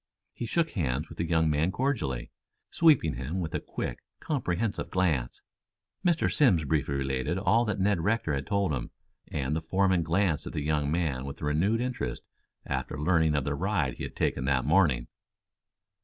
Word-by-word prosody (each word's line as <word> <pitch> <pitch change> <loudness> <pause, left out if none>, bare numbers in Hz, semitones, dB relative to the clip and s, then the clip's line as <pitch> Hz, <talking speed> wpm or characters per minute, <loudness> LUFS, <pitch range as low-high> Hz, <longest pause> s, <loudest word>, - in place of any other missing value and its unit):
He 120 - -5
shook 165 +5 +1
hands 75 - -1
with - - -12
the 85 - 0
young 80 -1 +3
man 75 +4 +2
cordially, 100 - -2 0.4
sweeping 135 - +4
him 70 +9 -3
with 80 -3 -3
a - - 0
quick, - - -5 0.2
comprehensive 115 - -2
glance. 80 -10 0 0.6
Mr. 175 -3 +2
Simms 95 - +4
briefly 70 -1 0
related 70 +4 -1
all 105 +5 +3
that 105 -3 -2
Ned 100 -1 +2
Rector 105 -3 0
had 70 -1 -3
told 100 -6 +1
him, 60 -3 -3 0.4
and 70 +1 -2
the 80 - -1
foreman 95 +2 +2
glanced 85 0 0
at - - -6
the 75 - -2
young 75 -1 0
man 75 -6 -1
with 70 - -7
renewed 90 +10 +1
interest 125 - -3 0.4
after 75 - -3
learning 80 -1 +3
of 70 - +1
the - - -1
ride - - -1
he - - -6
had - - -6
taken 65 - 0
that 65 -2 +1
morning. 75 -7 +3
80 Hz, 175 wpm, -28 LUFS, 70-100 Hz, 0.6 s, sweeping